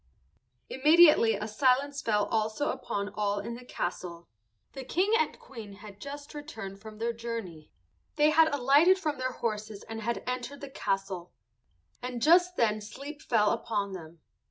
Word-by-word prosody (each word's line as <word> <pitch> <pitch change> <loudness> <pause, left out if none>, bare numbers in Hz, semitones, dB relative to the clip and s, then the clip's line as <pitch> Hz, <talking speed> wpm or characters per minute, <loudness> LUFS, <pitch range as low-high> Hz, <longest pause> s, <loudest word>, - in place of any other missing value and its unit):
Immediately 300 -5 +6
a 210 +2 -4
silence 270 +5 +1
fell 210 -4 +1
also 220 +6 0
upon 200 -3 -4
all 205 -1 -1
in 220 +4 -4
the 245 +2 -9
castle. 175 -6 -5 0.5
The 270 - -6
King 370 - +1
and 470 - 0
Queen 225 -6 -10
had 205 0 -13
just 285 +1 -8
returned 220 -10 -8
from 215 0 -10
their 230 +2 -1
journey; 225 -9 -6 0.5
they 300 0 +4
had 315 0 +5
alighted 285 +7 +5
from 305 -7 -3
their 255 0 -2
horses 215 -3 -4
and 225 0 -7
had 235 +2 -2
entered 250 +3 -4
the 280 -1 -8
castle, 195 -6 -3 0.7
and 250 -1 -4
just 355 +7 +5
then 215 -5 +1
sleep 280 +8 -9
fell 210 -3 +2
upon 210 -4 -2
them. 165 -2 -10
230 Hz, 155 wpm, -29 LUFS, 210-285 Hz, 0.7 s, Immediately